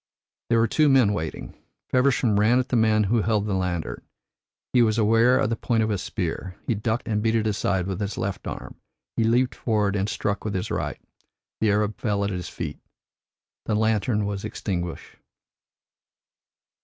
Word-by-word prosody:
There 115 - +4
were 115 0 +4
two 150 +6 +3
men 130 -7 +5
waiting. 80 -5 -5 0.4
Feversham 125 -5 +3
ran 110 +4 +4
at 130 0 0
the - - +1
man 110 -2 +4
who 110 +3 +2
held 105 -1 +1
the 105 - -1
lantern. 90 -3 -2 0.7
He 125 - +5
was 110 -1 +3
aware 115 +3 +4
of 110 - +1
the - - +1
point 115 0 0
of 110 - 0
a 100 - 0
spear, 90 -1 -4
he - - +1
ducked 110 +3 -2
and 105 -2 0
beat 110 +1 +1
it 110 -1 +1
aside 100 -3 0
with 95 -1 -3
his 100 0 -3
left 100 -1 -3
arm, - - -7 0.3
he 115 - +1
leaped 120 +3 +2
forward 105 -3 0
and 100 +1 0
struck 105 -1 -2
with 105 -2 -3
his 95 - -3
right. - - -2 0.6
The 110 - +2
Arab 105 +1 0
fell 100 -2 0
at 100 - -1
his 90 -2 -4
feet; - - -6 0.9
the 110 - +1
lantern 110 0 +1
was 100 -1 -3
extinguished. 90 -5 -4
105 Hz, 180 wpm, -25 LUFS, 100-115 Hz, 0.9 s, men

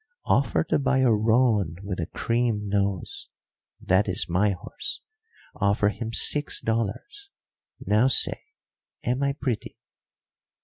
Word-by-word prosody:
Offer - - +2
to - - 0
buy 135 -1 +2
a 130 -3 +4
roan 110 -5 +2
with 100 -2 -4
a 85 - -2
cream 115 -3 -1
nose. 100 -2 -2 0.5
That 95 +3 +2
is 90 - -1
my 95 +5 +2
horse. 100 - -5 0.5
Offer 105 +1 +2
him 115 +2 -5
six 145 +5 +1
dollars. 115 - -3 0.5
Now 105 +5 +2
say, 135 - +2 0.6
am 125 +3 -1
I 140 0 +1
pretty?" 130 -6 -4
110 Hz, 125 wpm, -25 LUFS, 100-130 Hz, 0.6 s, a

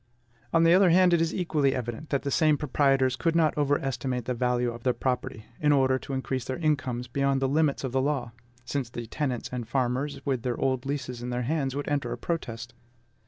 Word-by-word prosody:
On 165 - +4
the 165 +1 +6
other 185 0 +6
hand, 180 +1 +5
it 170 - +4
is 165 -1 +1
equally 150 -7 +1
evident 120 +4 -5
that 140 - 0
the 140 - -2
same 155 0 +3
proprietors 135 -3 +2
could 165 +4 0
not 160 -2 +3
overestimate 135 -4 -1
the 125 - -1
value 125 0 0
of 120 0 -9
their 125 +1 +1
property, 125 -4 -2
in 150 -1 +3
order 130 -2 +3
to 135 - -7
increase 130 -1 -2
their 130 0 -4
incomes 130 -7 -1
beyond 140 +2 +1
the 135 - +1
limits 145 0 +1
of 130 - -2
the 130 +1 +1
law, 135 -4 -1 0.3
since 135 -3 -2
the 120 -1 -6
tenants 125 +1 -3
and 120 -3 -4
farmers, 130 +2 -1
with 130 -4 0
their 120 0 -2
old 130 0 0
leases 125 -4 -4
in 125 - -4
their 125 0 -2
hands, 135 0 -1
would 145 - -3
enter 145 -1 -1
a - - -3
protest. 120 -8 -4
135 Hz, 215 wpm, -27 LUFS, 125-150 Hz, 0.3 s, the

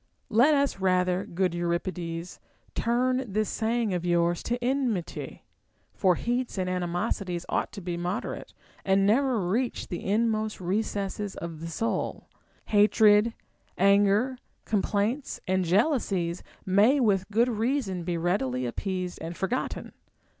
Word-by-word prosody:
Let 255 +8 +5
us 280 -7 +1
rather, 185 0 +2
good 180 +1 0
Eurip 170 0 -1
ides, 170 0 -6 0.3
turn 255 +2 +1
this 215 +1 0
saying 225 -2 0
of 175 -1 -1
yours 175 -1 +2
to 240 - -1
enmity; 245 -8 -2 0.5
for 185 -3 +3
heats 245 +1 -2
and 185 -1 -1
ani 180 -1 -1
mosities 175 -1 -2
ought - - 0
to 200 - -7
be 175 -1 -3
moderate, 175 +3 -4 0.3
and 195 0 +3
never 250 +3 +3
reach 235 +7 -1
the 175 - -4
inmost 215 +1 0
recesses 200 +1 -2
of 165 -2 -6
the 165 - -6
soul; 225 +7 -2 0.4
hatred, 210 +1 +5 0.4
anger, 200 +6 +3 0.3
complaints, 215 +5 -1
and 185 0 +1
jealousies 190 - +1 0.2
may 210 +9 +4
with 200 -6 +2
good 230 +3 +3
reason 225 -5 -1
be 170 0 -2
readily 150 -8 0
appeased 180 +7 -3
and 165 +1 -6
forgotten. 235 +7 -2
200 Hz, 130 wpm, -27 LUFS, 180-230 Hz, 0.5 s, Let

